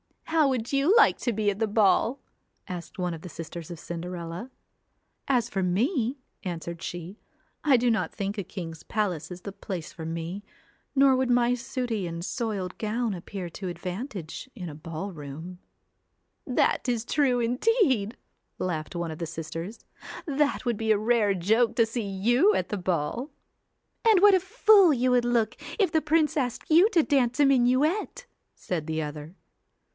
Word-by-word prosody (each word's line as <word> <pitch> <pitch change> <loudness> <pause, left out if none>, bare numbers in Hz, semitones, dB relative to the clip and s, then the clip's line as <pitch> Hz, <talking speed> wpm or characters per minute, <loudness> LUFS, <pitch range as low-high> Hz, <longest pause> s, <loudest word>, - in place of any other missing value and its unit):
'How 320 -3 +2
would 250 -1 -2
you 280 +9 +4
like - - +5
to 240 - -1
be 210 -1 +1
at 200 - -7
the 225 - +1
ball?' 220 +4 +3 0.5
asked 175 -2 -7
one 180 -2 -1
of 160 - -8
the 180 - -8
sisters 165 +1 -8
of 170 - -7
Cinderella. 170 +5 -6 0.8
'As 245 -4 +2
for 195 - -2
me!' 240 - 0 0.3
answered 170 -2 -5
she, 175 +4 -6 0.4
*I 280 -4 +5
do 240 0 +2
not 225 - 0
think 200 +1 -4
a 200 - -2
king's 165 -4 -7
palace 190 -7 -2
is 180 0 -8
the 200 - -6
place 185 -4 -6
for 160 - -7
me, 165 +4 -4 0.5
nor 270 -1 +6
would 260 0 0
my 245 0 +3
sooty 245 -5 -3
and 170 +1 -5
soiled 205 -7 -3
gown 225 +1 -1
appear 185 +1 -6
to 185 +3 -7
advantage 180 - -6
in 180 -7 -6
a - - -8
ball 165 +5 -6
room.' 160 +3 -8 0.9
CINDER 250 - +1
ELLA - - +6
'That - - -3
is 235 -2 -1
true 260 -2 +2
indeed,' 250 - +1 0.4
laughed 165 -3 -3
one 170 -1 -2
of 155 - -8
the 170 - -3
sisters. 165 +6 -6 0.4
'That 290 -2 0
would 240 -3 0
be 220 0 0
a 215 - +5
rare 215 -2 +2
joke 220 +6 +2
to 230 - +4
see 230 +2 -3
you 240 - +3
at - - -1
the 210 - -2
ball.' 180 - -2 0.8
'And 435 -4 +7
what 410 0 +8
a 375 - +6
fool 380 -1 +5
you 255 -1 +1
would 245 -1 +3
look 235 -2 +1 0.2
if 395 -7 +2
the 315 - +2
prince 310 +1 +2
asked 255 0 -2
you 350 +7 +7
to 340 -8 +3
dance 260 -3 +1
a 290 - +6
minuet,' 275 - +2 0.3
said 165 -4 -4
the 160 0 -1
other. 150 +3 -7
220 Hz, 180 wpm, -27 LUFS, 175-260 Hz, 0.9 s, what